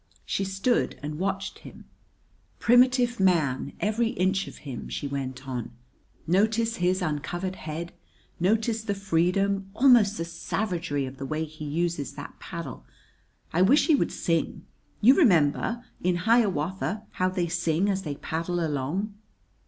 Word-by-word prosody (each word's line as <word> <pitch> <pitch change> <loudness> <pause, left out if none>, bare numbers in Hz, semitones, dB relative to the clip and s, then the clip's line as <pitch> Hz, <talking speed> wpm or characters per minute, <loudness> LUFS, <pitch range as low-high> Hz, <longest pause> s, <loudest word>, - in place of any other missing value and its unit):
She 195 - -1
stood 195 +6 0
and 150 +1 -4
watched 195 +1 -2
him. - - -13 0.7
"Primitive 245 0 +4
man, 155 -9 +2
every 220 +3 +1
inch 195 -2 0
of - - -10
him!" 130 -4 -6
she 145 - -3
went 135 -1 -5
on. 125 -3 -4 0.5
"Notice 220 +6 +2
his 180 +1 +1
uncovered 175 +4 -3
head. 160 +2 -6 0.5
Notice 220 +5 +1
the 205 -2 -1
freedom, 195 +1 +1
almost 235 -6 +5
the 165 - -2
savagery, 170 -5 -2
of 130 +1 -8
the 135 - -5
way 155 +2 -2
he 155 0 -9
uses 160 -1 -2
that - - -9
paddle. - - -7 0.7
I 170 - +2
wish 255 +11 +5
he 325 - +4
would 280 - +2
sing. 165 -1 -1 0.4
You 240 +5 +8
remember, 225 - +3 0.2
in 180 0 +2
Hiawatha, 205 -2 +1
how 185 0 0
they 180 -2 -1
sing 170 +1 +1
as 195 -1 0
they 150 -5 -4
paddle 170 +4 -3
along?" 155 +9 -2
185 Hz, 145 wpm, -27 LUFS, 155-210 Hz, 0.7 s, You